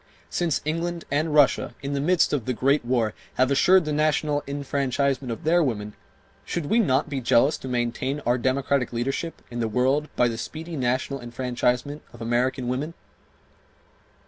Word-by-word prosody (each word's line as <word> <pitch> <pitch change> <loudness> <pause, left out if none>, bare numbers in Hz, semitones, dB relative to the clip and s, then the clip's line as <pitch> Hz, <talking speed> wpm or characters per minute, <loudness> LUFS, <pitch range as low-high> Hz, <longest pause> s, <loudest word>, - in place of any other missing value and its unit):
Since 170 -4 0
England 170 +2 -2
and 155 +2 +1
Russia, 145 -3 +3
in 140 +1 -3
the 140 - -1
midst 175 +2 +3
of 140 -6 -1
the 130 - 0
great 140 +4 +2
war, 120 -3 0 0.2
have 130 +1 +2
assured 180 +5 +5
the 150 - -1
national 150 -1 +1
enfranchisement 140 -2 -1
of 115 - -6
their 170 +3 +4
women, 105 -8 -2 0.5
should 170 -3 -3
we 220 +10 +2
not 140 - +2
be 140 -3 -3
jealous 125 +4 +4
to - - -8
maintain 125 +3 -1
our 120 0 +1
democratic 130 0 0
leadership 135 +7 -3
in 120 - -4
the 115 - 0
world 130 +7 +1
by 125 - +3
the 115 -1 -3
speedy 160 +7 -6
national 130 +1 -1
enfranchisement 125 +3 -1
of 120 - -13
American 120 +2 0
women? 140 +7 -2
135 Hz, 170 wpm, -25 LUFS, 125-150 Hz, 0.5 s, assured